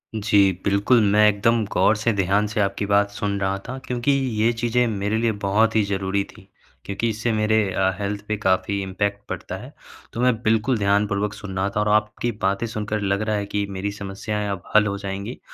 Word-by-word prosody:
जी, 100 -2 +4
बिल्कुल। 100 +5 +3
मैं 105 +1 +5
एकदम 110 +2 +2
ग़ौर 110 - +4
से 110 +3 0
ध्यान 100 +2 +1
से 105 +1 -3
आपकी 100 +1 -1
बात 100 0 +3
सुन 100 -1 -2
रहा 95 0 0
था 130 +2 -5
क्योंकि, 125 +2 0
ये 120 -5 +1
चीज़ें 120 +1 +1
मेरे 105 0 -1
लिए 115 0 +1
बहुत 110 +3 +2
ही 110 - +4
ज़रूरी 95 0 0
थी। 110 - -16 0.4
क्योंकि 100 +4 -2
इससे 115 +2 -1
मेरे 110 0 +2 0.2
अ, 95 0 +2
हेल्थ 100 +1 -3
पे 110 -1 -1
काफ़ी 95 0 0
इम्पैक्ट 100 +2 -2
पड़ता - - -5
है, - - -11 0.4
तो 115 - -3
मैं 125 0 +4
बिल्कुल 110 +3 +2
ध्यानपूर्वक 100 0 +1
सुन 105 -3 -8
रहा 95 +1 +1
था - - +1
और 105 0 +1
आपकी 105 +2 +1
बातें 100 +3 0
सुनकर 105 -1 -3
लग 100 0 0
रहा 110 0 0
है 100 -1 -2
कि 100 0 -2
मेरी 100 +1 -3
समस्याएँ 100 +1 -4
अब 95 -3 -5
हल 105 0 +7
हो 100 - -2
जाएँगी। 100 +4 -5
105 Hz, 205 wpm, -23 LUFS, 100-110 Hz, 0.4 s, हल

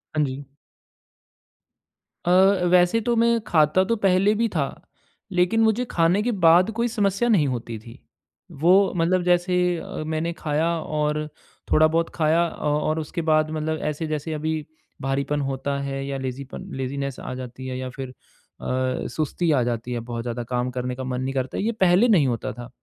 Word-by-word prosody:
हाँ 155 - +3
जी। 135 +1 -6 1.8
अ, 175 - +2 0.4
वैसे 180 +4 +4
तो 235 +1 0
मैं 235 0 +3
खाता 155 +2 +3
तो - - +4
पहले 195 0 +3
भी 230 +2 +1
था। - - +2 0.7
लेकिन 180 +5 +2
मुझे 220 +3 +2
खाने 170 +4 +3
के 245 - 0
बाद 175 +6 +6
कोई 235 - +2
समस्या 210 0 0
नहीं 175 -11 +4
होती 120 -3 -4
थी। 115 +2 -13 0.6
वो 190 +4 +5
मतलब 175 +2 +2
जैसे 180 +1 +2 0.2
अ, 160 - -6
मैंने 160 +2 -2
खाया 155 0 -1
और 150 -1 -1 0.4
थोड़ा 155 0 +6
बहुत 165 +1 0
खाया 160 +1 +3
अ, - - -9
और 150 +2 0
उसके 160 +2 -4
बाद 155 -1 +2
मतलब 155 0 -2
ऐसे 155 +2 -4
जैसे 155 +1 -3
अभी 155 0 -2 0.4
भारीपन 140 +2 -1
होता 135 +1 -2
है 135 0 -4
या 140 0 -3
लेज़ीपन 130 0 -6
लेज़ीनेस 140 0 -3
आ - - -6
जाती 130 0 -7
है 130 0 -4
या 130 0 -4
फिर 130 +1 -7
अ, 130 0 -5
सुस्ती 160 +2 -1
आ 140 -4 +3
जाती 120 0 -3
है 120 - -2
बहुत 115 0 -5
ज़्यादा, 120 0 -4
काम 125 +1 -2
करने 125 0 -3
का 130 - -6
मन 125 0 -3
नहीं 135 +1 -2
करता। 130 -1 -2
ये 220 +3 0
पहले 190 0 +4
नहीं 190 - +4
होता 120 -3 -2
था। 120 +2 -9
155 Hz, 180 wpm, -24 LUFS, 130-180 Hz, 1.8 s, बाद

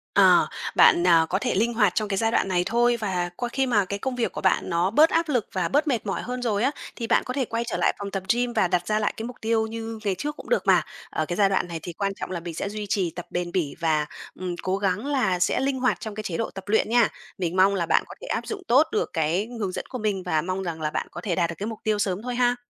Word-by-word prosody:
Ờ, - - +6 0.3
bạn, 175 +1 +6
à, 165 -2 +6
có 190 - +1
thể 245 +3 -1
linh 230 +5 +2
hoạt 210 -5 +2
trong 215 -1 0
cái 195 - -1
giai 225 +2 +1
đoạn - - +2
này 180 -2 +1
thôi. 240 +3 +2
Và 185 -5 -1
qua 245 -1 -3
khi 270 +2 0
mà 210 -6 +2
cái 200 +2 -4
công 260 +2 -2
việc 240 -2 -1
của - - -6
bạn 190 - +2
nó 170 +2 +1
bớt 300 +10 +5
áp 330 -1 +1
lực 245 -7 +1
và 185 -4 0
bớt 295 - +1
mệt 245 -6 0
mỏi 195 - -2
hơn 250 +1 -4
rồi 220 -3 0
á, 270 - +3 0.2
thì 230 -2 -4
bạn - - +3
có 255 - -3
thể 265 -3 0
quay 230 +1 -2
trở 235 - -2
lại - - +2
phòng 200 -1 -5
tập 195 -1 -3
gym 245 0 -1
và 185 - +3
đặt 175 0 0
ra 215 0 +1
lại 210 - 0
cái 225 - -4
mục 245 +1 -7
tiêu 220 0 +1
như 225 0 -6
ngày 195 -2 +1
trước 295 +8 -3
cũng - - -10
được - - +2
mà. - - +6 0.3
Ở 155 - -1
cái 175 - -3
giai 200 0 +4
đoạn 190 - +1
này 170 -1 -5
thì 175 - -6
quan 195 +3 -2
trọng - - -6
là 175 - -2
mình 170 0 -7
sẽ 200 +5 -3
duy 210 0 -5
trì 185 -5 0
tập 175 - -6
bền 175 -1 -3
bỉ 170 -7 -1
và, 155 -2 +1 0.3
ừm, 180 -1 -3
cố 190 +1 0
gắng 200 +3 -1
là 250 -11 +1
sẽ 180 - +2
linh 265 0 0
hoạt 250 -7 +1
trong 220 -2 -6
cái 215 - -5
chế 175 -5 -3
độ 230 - -1
tập 195 - -8
luyện 215 +1 +2
nha. 235 -1 +5 0.3
Mình 180 -1 -2
mong 190 +2 +5
là 170 -3 0
bạn - - +3
có - - -10
thể - - -8
áp - - -2
dụng 405 -3 -5
tốt 285 +6 +5
được - - 0
cái 165 +7 0
hướng 195 -3 -1
dẫn - - -5
của 255 - -4
mình 205 -4 -1
và 160 -3 +1
mong 185 +3 -3
rằng 165 -3 -4
là 150 - 0
bạn - - -3
có - - -7
thể 180 -6 -1
đạt 170 -2 +1
được 170 - -5
cái 205 - -4
mục 225 -2 -6
tiêu 215 -1 +1
sớm 195 0 -1
thôi 250 -1 -3
ha! 245 0 +3
205 Hz, 310 wpm, -25 LUFS, 180-240 Hz, 0.3 s, Ờ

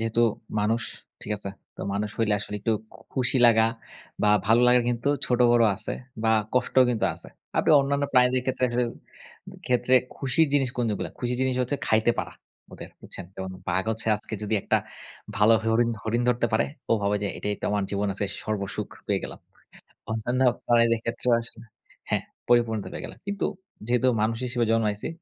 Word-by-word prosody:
যেহেতু 115 +1 +1 0.4
মানুষ, 115 +3 +1 0.4
ঠিক 105 - -3
আছে? 100 -1 -4 0.3
তো - - -9
মানুষ 105 +2 -1
হইলে 110 -2 +2
আসলে 105 - -6
একটু 110 +3 +1 0.4
খুশি 130 0 +1
লাগা 110 -1 +5 0.6
বা 105 - +4 0.2
ভালো 115 +2 +5
লাগার 125 0 +5
কিন্তু 120 +2 -1 0.2
ছোট-বড় 120 -1 +4
আছে - - -4 0.3
বা 110 - +4 0.2
কষ্টও 130 +1 +4
কিন্তু 115 -3 0
আছে। - - -7 0.3
আপনি - - +3
অন্যান্য 140 +1 0
প্রাণীদের 125 0 +4
ক্ষেত্রে 130 -1 0
আসলে 120 +1 +1 0.8
ক্ষেত্রে 125 +1 +2 0.2
খুশির 140 +4 +2
জিনিস 135 -3 +2
কোনগুলো? 110 -4 -1
খুশির 125 0 -1
জিনিস 130 -1 +1
হচ্ছে 125 +4 -1
খাইতে 110 +2 +3
পারা, - - -3 0.4
ওদের - - -9
বুঝছেন? 95 - -7
যেমন 95 0 -5 0.2
বাঘ 95 +2 +1
হচ্ছে 110 0 -1
আজকে 110 - -8
যদি 105 +1 -1
একটা - - +2 0.6
ভালো 105 +2 +5
হরিণ 115 +1 +2
হরিণ 115 +2 0
ধরতে 120 -1 +2
পারে, 110 +1 +2 0.2
ও - - +6
ভাবে 100 +1 +1
যে 100 - 0
এটাই 105 - -2
তো - - -5
আমার 100 -1 0
জীবনে 100 0 0
আজকে 100 0 -1 0.2
সর্বসুখ 100 -2 -3 0.2
পেয়ে - - 0
গেলাম। - - -8 0.7
অন্যান্য 120 +3 -1 0.3
প্রাণীদের 115 -1 +4
ক্ষেত্রেও 120 +1 -1
আসলে 115 0 -11 0.5
হ্যাঁ, - - +1 0.3
পরিপূর্ণতা 115 -3 +2
পেয়ে - - -6
গেলাম। - - -12
কিন্তু 200 -1 -1 0.4
যেহেতু 125 +1 +3
মানুষ 110 +1 0
হিসেবে 120 -1 0
জন্মাইছি, 105 -2 0
115 Hz, 170 wpm, -26 LUFS, 110-125 Hz, 0.8 s, ও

